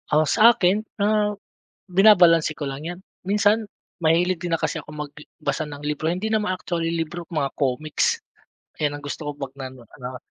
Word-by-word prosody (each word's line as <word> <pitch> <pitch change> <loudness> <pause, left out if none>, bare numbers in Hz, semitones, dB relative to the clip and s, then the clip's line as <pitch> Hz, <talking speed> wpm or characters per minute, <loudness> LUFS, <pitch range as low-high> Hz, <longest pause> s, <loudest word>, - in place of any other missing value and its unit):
Ah, 155 +1 +4
sa 220 +9 +6
akin, 190 +3 +2 0.2
ah, 210 0 +2 0.5
binabalanse 180 -4 +6
ko 150 -2 -5
lang 135 +1 -6
'yan. 175 +2 -5 0.3
Minsan 205 +3 +3 0.4
mahilig 170 +2 +2
din 175 -1 -3
na 165 - +1
kasi 165 - -2
ako - - -13
mag 150 -1 -6
i 150 - -11 0.2
basa 155 +1 -1
ng 145 -1 -8
libro. 150 +2 -1
Hindi 185 +5 -2
naman 215 -3 +1
actually 170 -2 -2
libro, 170 +1 -3
mga 145 -5 -1
komiks. 155 - 0 0.6
Ayan 145 -2 0
ang 145 - -13
gusto 145 +1 -4
ko - - -1
'pag 135 -2 -6
nano 130 -2 -8 0.2
ano. 125 0 -6
165 Hz, 185 wpm, -23 LUFS, 150-185 Hz, 0.6 s, sa